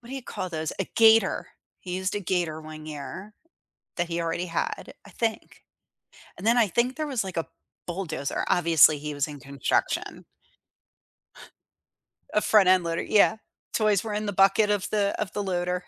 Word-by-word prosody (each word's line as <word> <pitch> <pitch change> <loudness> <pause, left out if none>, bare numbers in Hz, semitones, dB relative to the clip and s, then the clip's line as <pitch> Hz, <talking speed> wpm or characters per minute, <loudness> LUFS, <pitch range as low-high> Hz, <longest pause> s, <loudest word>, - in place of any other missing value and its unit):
What 240 0 -14
do 270 - -5
you 270 - -5
call 185 -5 -5
those? 160 -2 -3
A 195 - 0
Gator. 225 -3 +4 0.3
He 180 0 -5
used 190 +1 -2
a 205 - -2
Gator 175 -4 -1
one 155 0 -10
year 155 +8 -8 0.6
that 175 -1 0
he 170 0 -3
already 170 +1 -2
had, 165 - -3
I - - -13
think. 225 -1 -3 0.8
And 215 - -3
then 235 - +4
I 235 - +5
think 240 +7 0
there 310 0 -2
was 260 -7 -1
like 190 -3 -7
a 165 - 0 0.4
bulldozer. 170 -6 -3
Obviously, 165 -3 +5
he 150 +1 -5
was 145 0 -1
in 145 -1 -9
construction. 140 -1 -2 2.1
A 210 - +3
front-end 185 -5 +5
loader, 165 0 -2
yeah. 215 +1 +3 0.4
Toys 215 -3 +2
were 220 -2 -4
in 210 +1 -2
the 205 - -2
bucket 195 +2 +4
of 205 -2 0
the 205 -2 0
of 210 -3 -2
the 205 - -2
loader. 180 -1 -2
185 Hz, 180 wpm, -26 LUFS, 165-210 Hz, 2.1 s, I